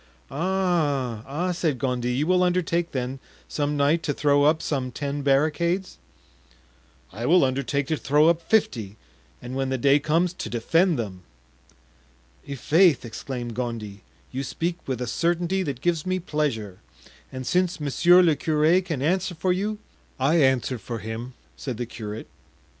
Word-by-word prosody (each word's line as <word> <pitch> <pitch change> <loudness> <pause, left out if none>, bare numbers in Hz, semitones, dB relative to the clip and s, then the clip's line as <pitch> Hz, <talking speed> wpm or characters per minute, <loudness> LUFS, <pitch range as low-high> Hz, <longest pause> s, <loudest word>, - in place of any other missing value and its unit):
"Ah, 150 - 0
ah," 170 +7 -1
said 165 -6 -1
Gondy, 125 -2 -1
"you 135 +5 0
will 180 +2 +3
undertake, 175 -1 +1
then, 130 0 -3 0.3
some 145 0 -1
night, 145 +4 +3
to 145 -4 -2
throw 145 -1 +3
up 155 +2 +4
some 130 -5 -2
ten 140 +3 -3
barricades?" 160 +7 +1 1.1
"I 115 +5 -4
will 175 -3 +5
undertake 140 +2 -1
to 155 +2 -1
throw 150 +3 +3
up 170 0 +3
fifty, 115 - 0 0.5
and 125 +1 -6
when 135 0 -1
the 130 - 0
day 140 +3 +4
comes, 165 +4 +1
to 150 - -6
defend 165 - +2
them." 100 -6 -5 1.3
"I'faith!" 150 +2 +3
exclaimed 120 +1 -5
Gondy, 110 -4 -5 0.3
"you 130 - -3
speak 170 +6 -3
with 130 -2 -2
a - - -1
certainty 175 +7 0
that 140 -8 -4
gives 170 -2 0
me 185 0 -1
pleasure; 140 - -2 0.5
and 130 -1 -6
since 180 +2 +1
monsieur 175 +5 +5
le 165 -3 +4
curé 155 +5 +2
can 160 -7 -3
answer 180 +3 0
for 180 +3 +1
you——" 210 +3 -2 0.4
"I 140 +6 +3
answer 130 -4 +2
for 115 +3 -5
him," 115 +4 -6 0.2
said 130 -5 -5
the 120 - -3
curate. 110 -2 -7
145 Hz, 155 wpm, -25 LUFS, 125-170 Hz, 1.3 s, will